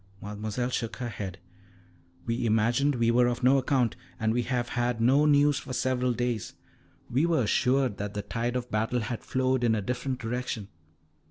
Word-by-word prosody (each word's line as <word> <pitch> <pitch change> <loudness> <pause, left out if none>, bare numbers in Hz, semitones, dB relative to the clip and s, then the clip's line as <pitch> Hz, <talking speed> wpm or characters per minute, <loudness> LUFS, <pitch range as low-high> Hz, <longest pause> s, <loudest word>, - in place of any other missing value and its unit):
Mademoiselle 105 +4 -3
shook 115 -2 -2
her 120 -2 -4
head. 100 -4 -6 0.9
"We 115 +1 -1
imagined 120 +6 +2
we 115 -1 +2
were 120 +1 +4
of 120 +1 -2
no 135 +2 +5
account, 130 -3 +1 0.2
and 110 0 +1
we 120 - +1
have 120 0 -2
had 120 -1 -1
no 135 +6 +4
news 145 -1 +4
for 130 - -7
several 125 -1 +1
days. 120 -3 -2 0.5
We 140 +8 +1
were 160 -7 +2
assured 125 +1 +2
that 105 0 -5
the 105 - -3
tide 120 +3 -2
of 125 -1 -3
battle 110 +3 0
had 110 +2 -4
flowed 130 -1 0
in 115 -2 +3
a 105 - -1
different 125 +4 -2
direction." 115 -3 -4
120 Hz, 180 wpm, -28 LUFS, 115-130 Hz, 0.9 s, no